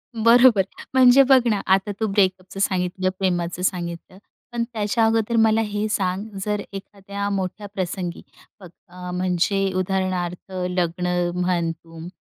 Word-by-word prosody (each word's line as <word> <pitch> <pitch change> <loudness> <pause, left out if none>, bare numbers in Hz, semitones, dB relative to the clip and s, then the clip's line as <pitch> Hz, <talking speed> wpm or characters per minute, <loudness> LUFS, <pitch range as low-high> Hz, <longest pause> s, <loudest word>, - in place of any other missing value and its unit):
बरोबर. 230 -1 +5 0.3
म्हणजे 260 +1 +7
बघ 265 -1 +8
ना, 210 -3 +1
आता 190 +2 +2
तू 220 - 0
ब्रेकअपचं 190 -2 0
सांगितलं, 185 -1 0
प्रेमाचं 175 -2 -1
सांगितलं. 175 0 -3 0.3
पण 240 -1 -1
त्याच्या 220 +1 +1
अगोदर 225 +1 +1
मला 220 0 +3
हे 210 +1 -2
सांग, 190 -1 -1 0.2
जर 210 -1 -1
एखाद्या 200 +1 -6
मोठ्या 200 +1 -3
प्रसंगी, 180 -2 -4 0.4
अ, - - -10 0.2
अ, 180 0 -8
म्हणजे 185 +2 0
उदाहरणार्थ 185 -1 -2 0.2
लग्न 180 0 -1 0.3
म्हण 180 -2 0
तुम, 165 0 -11
190 Hz, 135 wpm, -22 LUFS, 180-210 Hz, 0.4 s, बघ